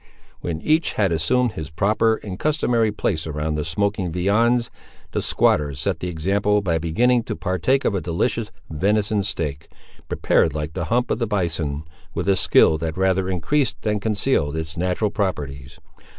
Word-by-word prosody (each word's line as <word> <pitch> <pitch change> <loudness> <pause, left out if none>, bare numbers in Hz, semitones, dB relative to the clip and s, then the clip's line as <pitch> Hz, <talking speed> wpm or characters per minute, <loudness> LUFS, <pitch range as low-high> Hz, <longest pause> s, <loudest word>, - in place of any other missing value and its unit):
When 80 -2 -4
each 160 +2 +2
had 100 -4 +1
assumed 120 +10 +2
his 80 -5 -6
proper 110 +7 +2
and 95 -3 -6
customary 120 -7 +1
place 85 -6 -2
around 75 0 -2
the 75 0 -1
smoking 95 +2 -1
viands, 115 +7 +2 0.4
the - - -1
squatter 70 -2 +2
set 70 - -1
the 90 - -3
example 100 +5 +1
by 85 -3 +1
beginning 120 +10 +2
to - - -3
partake 100 - 0
of - - +2
a 95 - -1
delicious 85 0 -1 0.2
venison 105 +5 +1
steak, 80 -8 -3 0.4
prepared 80 - +2
like 75 +1 -3
the 90 -1 -3
hump 120 +6 0
of - - 0
the 115 - 0
bison, 80 -7 -1 0.3
with - - -2
a 100 - +4
skill 80 -3 +4
that 80 +1 -3
rather 95 0 +1
increased 110 - 0
than 105 -1 0
concealed 100 - 0
its 80 0 -5
natural 90 +4 0
properties. 75 - -3
95 Hz, 165 wpm, -22 LUFS, 80-105 Hz, 0.4 s, a